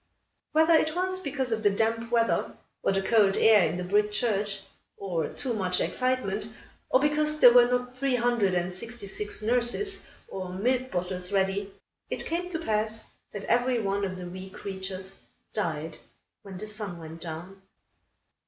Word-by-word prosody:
Whether 320 Hz, +2 st, +5 dB
it 315 Hz, 0 st, +3 dB
was 370 Hz, +1 st, 0 dB
because 275 Hz, -7 st, -2 dB
of 225 Hz, -1 st, 0 dB
the 205 Hz, -, +4 dB
damp 225 Hz, +3 st, 0 dB
weather, 230 Hz, -1 st, +1 dB, 0.3 s
or -, -, +2 dB
the 195 Hz, 0 st, 0 dB
cold 205 Hz, -3 st, +4 dB
air 215 Hz, -5 st, +6 dB
in 175 Hz, -, -3 dB
the 180 Hz, -, -3 dB
brick 210 Hz, +3 st, +2 dB
church, 210 Hz, -3 st, 0 dB, 0.4 s
or 170 Hz, -6 st, -2 dB
too 255 Hz, -3 st, -2 dB
much 185 Hz, -4 st, 0 dB
excitement, 255 Hz, -5 st, 0 dB, 0.4 s
or 255 Hz, -, +5 dB
because 300 Hz, +1 st, +2 dB
there 245 Hz, -4 st, +9 dB
were 245 Hz, -1 st, +7 dB
not 250 Hz, 0 st, -1 dB
three 265 Hz, 0 st, +1 dB
hundred 240 Hz, -6 st, +2 dB
and 175 Hz, +1 st, -1 dB
sixty 230 Hz, +4 st, -7 dB
six 205 Hz, +2 st, -5 dB
nurses, 245 Hz, -, +1 dB, 0.2 s
or 185 Hz, -1 st, -5 dB
milk 250 Hz, +8 st, 0 dB
bottles 180 Hz, 0 st, -3 dB
ready, 195 Hz, 0 st, 0 dB, 0.4 s
it -, -, -3 dB
came 350 Hz, +2 st, -2 dB
to 345 Hz, -, -2 dB
pass 220 Hz, -6 st, -1 dB, 0.3 s
that 205 Hz, -, -6 dB
every 245 Hz, +2 st, +2 dB
one 200 Hz, -1 st, -1 dB
of 185 Hz, -1 st, -2 dB
the 180 Hz, -, -6 dB
wee 185 Hz, +2 st, -8 dB
creatures 190 Hz, 0 st, -6 dB, 0.3 s
died -, -, -3 dB, 0.4 s
when 195 Hz, -2 st, -9 dB
the 210 Hz, -, -5 dB
sun 210 Hz, -4 st, -4 dB
went 165 Hz, 0 st, -9 dB
down. 175 Hz, +4 st, -7 dB
210 Hz, 170 wpm, -28 LUFS, 190-250 Hz, 0.4 s, there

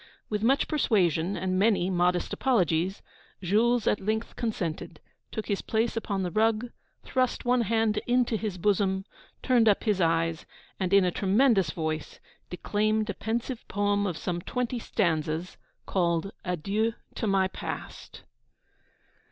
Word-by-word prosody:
With 210 Hz, -1 st, -1 dB
much 265 Hz, +5 st, +3 dB
persuasion 190 Hz, -, +1 dB
and 185 Hz, 0 st, -1 dB
many 195 Hz, -3 st, +2 dB
modest 180 Hz, 0 st, +1 dB
apologies, 185 Hz, -, +1 dB, 0.4 s
Jules 225 Hz, +6 st, +2 dB
at 210 Hz, -, +2 dB
length 220 Hz, +3 st, -2 dB
consented, 175 Hz, -8 st, -3 dB, 0.3 s
took 220 Hz, -, -4 dB
his 200 Hz, -, -1 dB
place 225 Hz, +1 st, 0 dB
upon 200 Hz, -4 st, -2 dB
the 180 Hz, -, -2 dB
rug, 225 Hz, +4 st, +1 dB, 0.3 s
thrust 255 Hz, -1 st, -1 dB
one 245 Hz, 0 st, +3 dB
hand 225 Hz, -1 st, +1 dB
into 245 Hz, -1 st, +2 dB
his 210 Hz, -4 st, -3 dB
bosom, 190 Hz, 0 st, +1 dB, 0.4 s
turned 240 Hz, -4 st, +4 dB
up 205 Hz, -, +2 dB
his 210 Hz, -4 st, +1 dB
eyes, 165 Hz, -1 st, +1 dB, 0.3 s
and, 185 Hz, -1 st, -1 dB
in 200 Hz, -1 st, +6 dB
a 180 Hz, -, +1 dB
tremendous 200 Hz, -, +3 dB
voice, 155 Hz, -1 st, -4 dB, 0.3 s
declaimed 215 Hz, +3 st, 0 dB
a -, -, -6 dB
pensive 230 Hz, +4 st, -3 dB
poem 205 Hz, 0 st, +1 dB
of 175 Hz, -4 st, -3 dB
some 175 Hz, +1 st, -3 dB
twenty 250 Hz, +4 st, -2 dB
stanzas, 165 Hz, -5 st, -1 dB, 0.3 s
called 170 Hz, 0 st, 0 dB
'Adieu 200 Hz, +6 st, -1 dB, 0.2 s
to 225 Hz, -, -3 dB
my 195 Hz, -1 st, +3 dB
past.' -, -, -7 dB
200 Hz, 140 wpm, -27 LUFS, 180-225 Hz, 0.4 s, in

